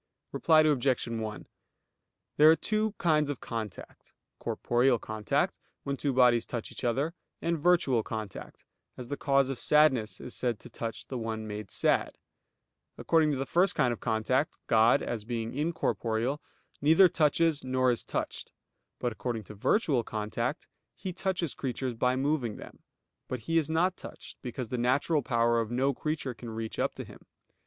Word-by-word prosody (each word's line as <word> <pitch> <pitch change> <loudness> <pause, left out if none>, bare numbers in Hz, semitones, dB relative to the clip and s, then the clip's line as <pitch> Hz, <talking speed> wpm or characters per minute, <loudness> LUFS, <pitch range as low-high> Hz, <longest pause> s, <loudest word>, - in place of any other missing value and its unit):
Reply 160 -2 +4
Obj. 140 -4 +2
1: 110 -2 -4 0.9
There 150 +1 +8
are 160 - +7
two 215 +3 -1
kinds 150 -4 +2
of 145 - -3
contact; 110 -3 -7 0.3
corporeal 120 +1 +1
contact, 110 -1 -1 0.2
when 140 - -2
two 140 +1 -1
bodies 125 -2 +4
touch 120 -3 -5
each - - -9
other; 135 +7 0 0.3
and 170 -1 -1
virtual 150 -8 +3
contact, 110 -2 -7 0.3
as 125 -1 -8
the 145 - -2
cause 140 -1 +2
of 135 - -4
sadness 140 -8 +3
is 125 - -5
said 120 -3 0
to - - -12
touch 115 -1 -5
the 130 - -5
one 110 -1 -4
made 105 -2 -6
sad. - - +1 0.8
According 160 -2 +3
to - - -1
the 135 - -2
first 180 +6 +2
kind 125 -2 +2
of - - -8
contact, 120 +6 0
God, 115 +1 +4
as 115 -3 -3
being 115 0 -4
incorporeal, 140 -4 -1 0.4
neither 160 +6 +7
touches, 160 -1 +2
nor 130 -1 +2
is 120 - -1
touched; - - -4 0.5
but 120 - -1
according 115 -1 -4
to 105 - -11
virtual 135 - +1
contact 115 +8 -3 0.3
He 185 -1 -5
touches 180 -6 -2
creatures 130 -1 -3
by 125 +2 +1
moving 135 -5 0
them; - - -11 0.5
but 125 -2 -4
He 165 +8 +2
is 155 -1 -2
not 180 +3 +1
touched, - - -11
because 125 -2 -5
the 125 - -2
natural 140 +5 +2
power 115 -2 +2
of 110 - -4
no 130 +3 +1
creature 150 -2 -3
can 120 0 -9
reach 110 0 -5
up - - 0
to - - -6
Him. - - -13
130 Hz, 165 wpm, -29 LUFS, 115-150 Hz, 0.9 s, There